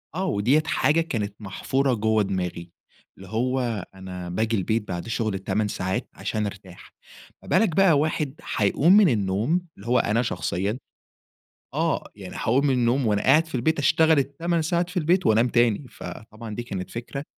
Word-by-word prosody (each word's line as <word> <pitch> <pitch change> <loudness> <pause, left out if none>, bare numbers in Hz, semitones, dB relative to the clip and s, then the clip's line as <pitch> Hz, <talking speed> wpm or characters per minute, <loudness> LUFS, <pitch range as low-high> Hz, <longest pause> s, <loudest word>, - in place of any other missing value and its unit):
آه، 190 - -1
و 100 - -1
ديّة 140 +9 +3
حاجة 165 -1 +2
كانت 105 -10 -3
محفُورة 130 +6 -1
جُوَّه 110 -1 +2
دماغي، 90 -3 -4 0.5
اللي 95 - -12
هو 120 -3 -1
أنا 90 -2 -7
باجي 110 +4 0
البيت 105 +3 -1
بعد 90 +3 -5
شُغل 110 -2 -1
ال8 95 +2 -1
ساعات 95 -1 -3
عشان 105 -1 -3
أرتاح، 95 -3 -9 0.5
ما - - -14
بالك 205 -8 +3
بقى 175 -7 +5
واحد 150 -2 -1
حيقُوم 140 - +2
من 205 -6 +6
النّوم 110 - +1 0.2
اللي 100 +4 -12
هو 125 0 +3
أنا 110 +3 +1
شخصيًا، 105 -2 -2 1.0
آه، - - 0
يعني - - -9
حاقُوم 135 +6 +2
من 135 - +3
النّوم 125 0 +2
وأنا 105 -1 +1
قاعد 155 +5 +5
في 165 - -7
البيت 150 +6 +1
أشتغل 160 +1 +4
ال8 165 +5 -1
ساعات 170 +2 0
في 180 - -6
البيت 180 +3 +2
وأنام 110 +3 +4
تاني، 120 +1 +2
فطبعًا 110 -1 -9
دي 120 - -4
كانت 95 -5 -5
فكرة 130 +4 -6
120 Hz, 175 wpm, -24 LUFS, 100-150 Hz, 1.0 s, من